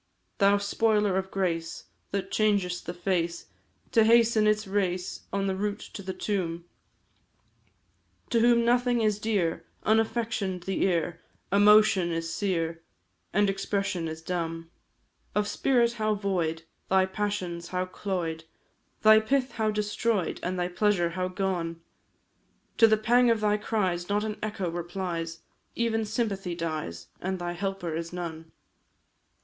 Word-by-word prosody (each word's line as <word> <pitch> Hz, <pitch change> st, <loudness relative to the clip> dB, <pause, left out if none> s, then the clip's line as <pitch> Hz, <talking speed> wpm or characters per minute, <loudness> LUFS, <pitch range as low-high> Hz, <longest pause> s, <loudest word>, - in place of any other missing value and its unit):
Thou 200 Hz, 0 st, +5 dB
spoiler 210 Hz, -1 st, +1 dB
of 190 Hz, 0 st, -1 dB
grace, 170 Hz, -4 st, -2 dB, 0.3 s
that 195 Hz, -1 st, -3 dB
changest 200 Hz, -5 st, +1 dB
the 175 Hz, -, -3 dB
face 175 Hz, -2 st, -1 dB, 0.5 s
To 225 Hz, -, +5 dB
hasten 230 Hz, -1 st, +5 dB
its 215 Hz, 0 st, +2 dB
race 185 Hz, -2 st, -2 dB
on 195 Hz, 0 st, 0 dB
the 190 Hz, -1 st, 0 dB
route 205 Hz, +1 st, -3 dB
to -, -, -6 dB
the 190 Hz, -1 st, -4 dB
tomb, 175 Hz, -4 st, -2 dB, 1.7 s
To 235 Hz, -, +3 dB
whom 235 Hz, 0 st, +4 dB
nothing 245 Hz, 0 st, +3 dB
is 210 Hz, -2 st, +1 dB
dear, 180 Hz, -7 st, 0 dB, 0.2 s
unaffection'd 220 Hz, -4 st, 0 dB
the 190 Hz, 0 st, -2 dB
ear, 170 Hz, -2 st, 0 dB, 0.3 s
Emotion 205 Hz, -2 st, +5 dB
is 165 Hz, 0 st, -3 dB
sere, 165 Hz, -4 st, -1 dB, 0.5 s
and 205 Hz, 0 st, +3 dB
expression 195 Hz, -2 st, -1 dB
is 160 Hz, 0 st, -7 dB
dumb; 165 Hz, -1 st, -3 dB, 0.6 s
Of 210 Hz, 0 st, +1 dB
spirit 240 Hz, 0 st, +2 dB
how 215 Hz, -2 st, 0 dB
void, 175 Hz, -5 st, -1 dB, 0.3 s
thy 190 Hz, 0 st, +4 dB
passions 190 Hz, -3 st, -3 dB
how 185 Hz, 0 st, -1 dB
cloy'd, 175 Hz, -4 st, -4 dB, 0.6 s
Thy 215 Hz, 0 st, +8 dB
pith 260 Hz, +4 st, 0 dB
how 220 Hz, -1 st, 0 dB
destroy'd, 210 Hz, -1 st, -1 dB
and 185 Hz, +1 st, -2 dB
thy 175 Hz, -, +1 dB
pleasure 180 Hz, -2 st, +1 dB
how 185 Hz, +1 st, -2 dB
gone! 180 Hz, -3 st, -2 dB, 1.0 s
To 225 Hz, -, +8 dB
the 220 Hz, 0 st, +4 dB
pang 240 Hz, +3 st, +4 dB
of 225 Hz, -2 st, +2 dB
thy 210 Hz, 0 st, +2 dB
cries 190 Hz, -5 st, -1 dB
not 205 Hz, +1 st, +1 dB
an 215 Hz, -1 st, -4 dB
echo 210 Hz, -4 st, -2 dB
replies, 170 Hz, -1 st, -4 dB, 0.3 s
Even 225 Hz, -1 st, 0 dB
sympathy 205 Hz, -5 st, -2 dB
dies 155 Hz, -, -4 dB
and 190 Hz, +1 st, -2 dB
thy 175 Hz, -1 st, -3 dB
helper 180 Hz, -2 st, -3 dB
is 165 Hz, +1 st, -4 dB
none. 165 Hz, -2 st, -6 dB
195 Hz, 140 wpm, -28 LUFS, 175-215 Hz, 1.7 s, Thy